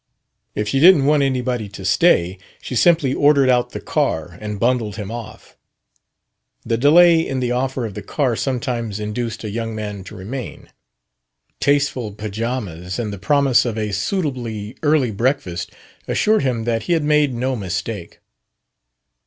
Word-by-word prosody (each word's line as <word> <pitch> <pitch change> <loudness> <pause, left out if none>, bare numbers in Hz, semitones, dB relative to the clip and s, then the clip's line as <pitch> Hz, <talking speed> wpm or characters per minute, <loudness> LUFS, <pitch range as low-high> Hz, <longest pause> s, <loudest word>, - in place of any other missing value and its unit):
If 105 0 -2
she 135 +6 +1
didn't 160 -3 +7
want 150 0 +4
anybody 125 -5 -1
to 95 -1 -9
stay, 95 - +3 0.2
she 125 - -6
simply 155 -2 +3
ordered 140 -2 +4
out 125 -1 +2
the - - -6
car 80 +2 -1
and 105 -1 -5
bundled 115 -4 0
him 105 -2 -6
off. 115 -1 -9 1.1
The 115 - 0
delay 165 +7 +6
in 135 -5 -2
the 125 -1 -1
offer 130 0 -1
of 110 - -6
the - - -6
car 130 -6 -1
sometimes 120 -5 -2
induced 110 +2 -4
a 105 - -4
young 115 0 -4
man 105 -2 -5
to 105 - -10
remain. 115 +7 -7 0.9
Tasteful 140 -6 +1
pajamas 105 -4 -4
and 110 -4 -3
the 100 - -7
promise 140 +3 +3
of 115 -3 -3
a 105 -1 -2
suitably 115 - -3
early 145 -6 +2
breakfast 110 -5 -1 0.4
assured 215 +1 +2
him 125 -4 -1
that 115 -1 0
he - - +4
had 165 -2 +1
made 150 -3 +2
no 130 +2 -1
mistake. 95 -2 -5
120 Hz, 155 wpm, -20 LUFS, 105-135 Hz, 1.1 s, didn't